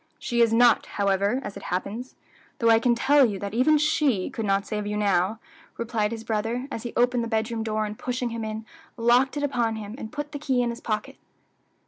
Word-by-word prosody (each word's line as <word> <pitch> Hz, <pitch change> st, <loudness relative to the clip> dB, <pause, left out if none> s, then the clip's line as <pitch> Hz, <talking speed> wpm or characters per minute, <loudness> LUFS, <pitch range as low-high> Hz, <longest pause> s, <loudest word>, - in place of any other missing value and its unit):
"She 235 Hz, -1 st, -1 dB
is 230 Hz, -1 st, +4 dB
not, 240 Hz, +2 st, +4 dB
however, 200 Hz, +4 st, +1 dB
as -, -, -6 dB
it 200 Hz, -, -8 dB
happens, 205 Hz, +8 st, -4 dB, 0.4 s
though 230 Hz, -1 st, +4 dB
I 225 Hz, -, +6 dB
can 240 Hz, 0 st, +2 dB
tell 275 Hz, +4 st, +4 dB
you 210 Hz, -6 st, +1 dB
that 200 Hz, +1 st, -5 dB
even 260 Hz, +7 st, +4 dB
she 295 Hz, -, +1 dB
could 225 Hz, -2 st, -3 dB
not 195 Hz, 0 st, +1 dB
save 210 Hz, -1 st, -3 dB
you 210 Hz, 0 st, -2 dB
now," 200 Hz, +1 st, +1 dB, 0.4 s
replied 225 Hz, -2 st, -1 dB
his 225 Hz, -1 st, -5 dB
brother, 225 Hz, +4 st, -2 dB
as 225 Hz, -, -4 dB
he 240 Hz, 0 st, -6 dB
opened 245 Hz, 0 st, +2 dB
the -, -, -3 dB
bedroom 225 Hz, 0 st, -1 dB
door, 215 Hz, -1 st, -1 dB
and 210 Hz, 0 st, -5 dB
pushing 250 Hz, -1 st, -2 dB
him 230 Hz, -1 st, -4 dB
in, 220 Hz, 0 st, -5 dB, 0.3 s
locked 245 Hz, +4 st, +3 dB
it 290 Hz, -, -2 dB
upon 240 Hz, -5 st, 0 dB
him, 210 Hz, -1 st, -7 dB
and 220 Hz, -, -7 dB
put 295 Hz, -1 st, -5 dB
the 290 Hz, -, -5 dB
key 260 Hz, -4 st, +1 dB
in 240 Hz, -, 0 dB
his 235 Hz, -, -8 dB
pocket. 215 Hz, -1 st, -3 dB
230 Hz, 220 wpm, -25 LUFS, 210-245 Hz, 0.4 s, I